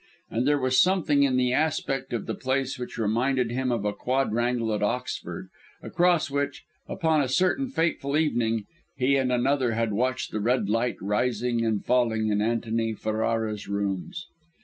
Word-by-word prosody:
And 120 +4 0
there 145 0 +4
was 130 -1 +3
something 180 -6 +3
in 135 -2 +3
the 125 -1 +2
aspect 135 -3 -1
of 120 -4 -3
the - - -3
place 130 0 -2
which 125 - -6
reminded 120 +3 +1
him 130 +1 -1
of 115 -4 -1
a 105 - 0
quadrangle 120 -2 0
at 105 - -2
Oxford, 120 +5 -3 0.3
across 175 -4 +2
which, 140 0 -2 0.2
upon 160 -4 +1
a 135 - 0
certain 185 - +1
fateful 160 - 0
evening, 115 -8 0 0.3
he 130 +2 +2
and 130 -2 +1
another 125 0 +1
had 115 -1 0
watched 130 +4 -1
the 110 - -2
red 115 0 +1
light 115 +3 0
rising 115 +3 0
and 110 -3 -1
falling 115 -3 +2
in 105 0 +1
Antony 115 0 0
Ferrara's 110 0 -2
rooms. 100 - -3
125 Hz, 165 wpm, -26 LUFS, 110-135 Hz, 0.3 s, there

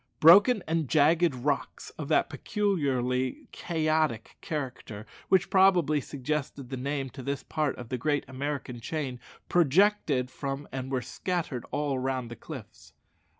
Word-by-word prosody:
Broken 200 +6 +7
and 160 -4 0
jagged 160 0 +4
rocks, 140 +3 -2
of 150 - -7
that 155 - +3
peculiarly 130 - -1
chaotic 155 -7 -1
character 130 -8 -5 0.2
which 190 0 +3
probably 180 -6 +4
suggested 140 -1 -4
the - - -2
name 135 0 -3
to 135 - -9
this 140 +2 -3
part 150 -3 -1
of 120 -2 -9
the 125 - -3
great 145 +2 0
American 130 -2 -4
chain, 130 -1 -4 0.3
projected 165 -5 +3
from 140 +1 -5
and 130 0 -5
were 130 -2 -1
scattered 170 -9 -3
all 145 -1 -1
round 130 -2 -2
the - - -6
cliffs. 115 -10 -11
140 Hz, 140 wpm, -28 LUFS, 130-160 Hz, 0.3 s, Broken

